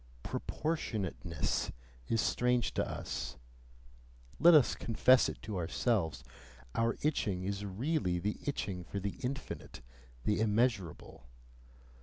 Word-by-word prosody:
PROPORTIONATENESS 105 - -2 0.4
is 115 - +2
strange 125 0 +1
to - - +1
us, - - -4 1.0
let 170 0 +8
us 145 -5 +6
confess 125 +3 +4
it - - -7
to 105 -3 -4
ourselves; 90 - 0 0.5
our 115 0 +1
itching 105 -11 0
is 100 +1 -2
really 100 - 0
the 105 +4 -2
itching 95 -10 -2
for 100 +4 -4
the 100 +4 -4
infinite, 135 - -5 0.4
the 105 - +1
immeasurable. 105 - 0
105 Hz, 110 wpm, -33 LUFS, 95-125 Hz, 1.0 s, let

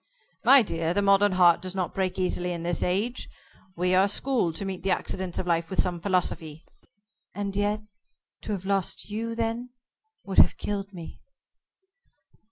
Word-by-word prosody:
"My 275 -2 +7
dear, 165 -3 -2
the 205 - +2
modern 200 0 +4
heart 175 -2 +5
does 185 +1 -6
not 185 -2 -2
break 190 -1 -1
easily 180 -1 -1
in 170 -1 -5
this 175 -1 -1
age. 205 +7 -1 0.5
We 180 +1 +1
are 190 +2 +5
schooled 205 -6 0
to 195 - -3
meet 190 -2 -4
the 195 - -2
accidents 185 -1 -2
of - - -2
life 170 -1 0
with 190 - -3
some 180 -2 +1
philosophy." 170 -4 -1 0.7
"And 200 -1 -3
yet 205 +1 0 0.6
to 215 - -4
have 190 -2 -5
lost 195 +1 -2
you 230 +2 -3
then, 230 +2 -2 0.5
would 195 - +1
have - - +6
killed 200 -1 -4
me." 170 -4 -10
190 Hz, 170 wpm, -26 LUFS, 180-205 Hz, 0.7 s, My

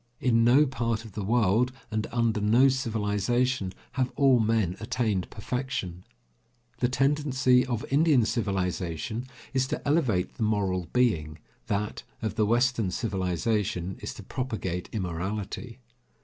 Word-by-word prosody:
In 115 -2 +3
no 130 +6 +6
part 115 -4 -2
of 110 - -10
the 100 +1 -5
world, 115 +3 +2 0.2
and 110 0 -1
under 115 -3 +1
no 120 +6 +5
civilization, 115 -2 0 0.2
have 130 0 -1
all 135 -3 +5
men 110 -5 +1
attained 110 -4 -1
perfection. 110 -6 -4 0.8
The 125 - +2
tendency 130 -1 +3
of 120 -3 -2
Indian 145 -4 +4
civilization 95 +1 -2 0.3
is 130 -1 +1
to - - -4
elevate 130 - +1
the - - -8
moral 100 -5 0
being, 85 -12 +1 0.3
that 105 +1 -2 0.2
of 110 - -1
the 105 - +1
western 120 -2 +2
civilization 95 -1 -1
is - - -5
to - - -9
propagate 105 -9 -4
immorality. 100 +5 -4
110 Hz, 130 wpm, -27 LUFS, 95-125 Hz, 0.8 s, no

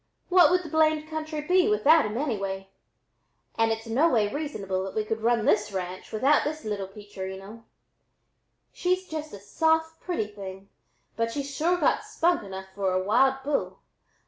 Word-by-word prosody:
What 360 -4 +7
would 360 +1 +2
the 320 - -8
blamed 310 0 +2
country 310 -1 -4
be 365 +6 +3
without 325 -7 +5
them 210 +2 -3
anyway? 195 -8 -3 0.8
an' 225 0 +2
it's 225 +1 -2
no 260 +9 +3
way 220 -8 +2
reasonable 200 -11 -3
that 190 - -6
we 215 -1 0
could 220 +1 -3
run 230 -1 +2
this 210 0 +2
ranch 185 -1 -5
without 265 +7 +3
this 310 -1 -4
little 205 -2 -3
peacherino. 195 +2 -9 1.1
She's 365 +1 0
just 310 -1 -5
a - - -8
soft 320 +9 0
pretty 350 -12 -2
thing, 195 -1 -9 0.5
but 230 0 -1
she's 280 +2 -4
sure 345 +5 +2
got - - +2
spunk 345 +1 +1
enough 190 -2 -8
for 195 -1 -1
a 185 0 +1
wild 265 +6 +3
bull. 285 +1 -1
230 Hz, 170 wpm, -27 LUFS, 200-315 Hz, 1.1 s, What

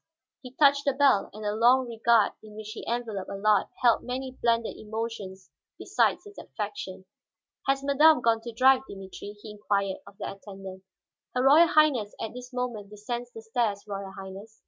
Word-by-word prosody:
He 255 -1 -12
touched 280 -1 +4
the 280 - +2
bell, 270 -7 +3
and 215 +2 -10
the 205 - 0
long 245 +4 +4
regard 230 -2 +3
in 215 -1 -13
which 215 0 -8
he 230 - -8
enveloped 230 -5 -3
Allard 200 +1 +2 0.2
held 235 -2 +5
many 260 +1 -4
blended 230 -1 +1
emotions 215 -4 -6 0.3
besides - - +1
its 410 0 -12
affection. 200 -3 -6 0.6
"Has 275 0 +1
madame 295 +2 +5
gone 230 -2 +2
to 235 - -7
drive, 260 +3 +5
Dimitri?" 195 +1 -9
he 210 - -10
inquired 200 -2 -1
of 200 0 -14
that 195 - -6
attendant. 195 -2 -10 0.5
"Her 250 - +1
Royal 300 +5 +7
Highness 285 -10 +3
at 225 - -5
this 250 +1 -9
moment 245 -5 -4
descends 235 +4 -5
the 225 - -10
stairs, 220 -3 -1
Royal 195 -1 -5
Highness." 195 +3 -10
225 Hz, 170 wpm, -27 LUFS, 205-250 Hz, 0.6 s, Royal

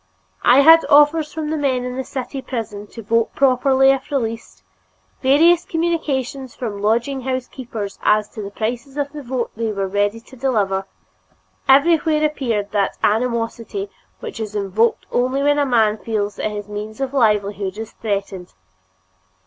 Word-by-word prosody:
I 255 +3 +6
had 325 +3 +8
offers 295 +1 +5
from 310 -2 -4
the 315 - -1
men 260 -3 0
in 250 0 -4
the 265 - -3
city 265 +1 -5
prison 210 -5 -5
to 230 +2 -10
vote 230 +2 0
properly 270 0 +4
if 270 -1 -2
released; 225 - -4 0.6
various 325 +6 +5
communications 280 -6 -2
from 210 -5 -5
lodging 235 +6 0
house 255 -1 -3
keepers 225 -6 -7
as 210 0 +3
to 215 - -8
the 200 - -6
prices 240 +7 -4
of 285 -1 -2
the 300 - -7
vote 250 -2 -3
they 225 0 -2
were 195 -2 -2
ready 205 +3 0
to 245 +3 -16
deliver; 205 -7 0 0.8
everywhere 305 +2 +4
appeared 235 -9 -2
that 200 -2 0
animosity 235 - -1 0.3
which 450 - -7
is 215 -1 -5
evoked 205 +3 +1
only 255 +3 0
when 290 0 +3
a 285 - +2
man 220 -4 +2
feels 210 -2 -2
that - - -1
his 205 -1 -6
means 210 +2 -7
of 270 0 -3
livelihood 205 -5 +1
is 225 0 -6
threatened. 195 -4 -4
240 Hz, 160 wpm, -20 LUFS, 210-275 Hz, 0.8 s, had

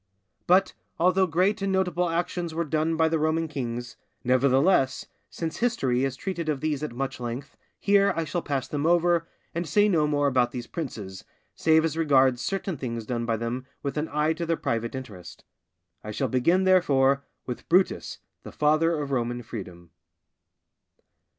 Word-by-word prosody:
But, 185 +2 +4 0.3
although 185 +2 +3
great 185 +5 +1
and 195 0 0
notable 180 -2 +1
actions 170 0 -2
were 170 - 0
done 155 +2 0
by 160 0 +3
the 160 0 0
Roman 160 +1 +1
kings, 120 -4 -5 0.3
nevertheless, 130 +3 +3 0.2
since 160 -1 -4
history 135 - +1
has 135 -1 -1
treated 170 0 -4
of 145 -3 0
these 150 -2 -1
at 150 - -3
much 135 +2 -4
length, 120 +3 -6 0.2
here 200 0 +4
I 165 - 0
shall 175 +3 -2
pass 140 -4 -2
them 150 +1 -1
over, 170 -1 +3 0.3
and 170 0 -3
say 205 +7 +4
no 160 -7 +2
more 145 -1 +1
about 125 -3 +3
these 120 0 -6
princes, 110 - -6 0.3
save 160 0 +3
as 160 -1 -2
regards 135 -5 +3
certain 195 +3 -2
things 115 -3 -4
done 120 0 -3
by 115 -1 +1
them 120 +3 -4 0.2
with 140 - -3
an 150 +1 -2
eye 150 +2 +1
to 170 +1 -4
their 165 -1 +1
private 115 +2 -2
interest. 105 -10 -9 0.6
I 105 - -7
shall 130 +5 -2
begin, 165 +10 +2
therefore, 140 -7 +3 0.2
with 125 - -7
Brutus, 185 +2 +2 0.2
the - - -10
father 155 +2 +2
of 145 -1 -4
Roman 120 -1 -1
freedom. 90 -7 -9
150 Hz, 170 wpm, -26 LUFS, 125-170 Hz, 0.6 s, But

